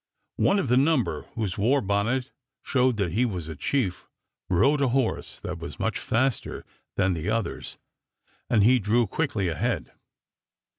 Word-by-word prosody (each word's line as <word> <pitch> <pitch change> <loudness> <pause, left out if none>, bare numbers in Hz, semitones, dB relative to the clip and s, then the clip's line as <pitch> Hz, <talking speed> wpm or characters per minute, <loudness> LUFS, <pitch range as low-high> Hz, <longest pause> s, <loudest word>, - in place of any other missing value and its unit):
One 200 - +3
of 195 - 0
the 125 +1 +3
number, 140 -2 +1
whose 105 -4 -2
war 125 +8 +3
bonnet 110 +5 0 0.3
showed 125 -3 +2
that 95 -5 0
he 110 +8 +2
was 90 -9 -2
a 80 - -6
chief, 100 - -1 0.4
rode 135 +12 +3
a 140 - +3
horse 130 -1 -1
that - - -5
was - - -8
much - - -1
faster 130 +2 -1 0.3
than 95 -1 +2
the 85 +4 -3
others, 115 0 -3 0.7
and 110 -4 +4
he 125 +4 +5
drew 115 +3 +2
quickly 110 - -1
ahead. 80 -3 -2
115 Hz, 155 wpm, -26 LUFS, 100-130 Hz, 0.7 s, he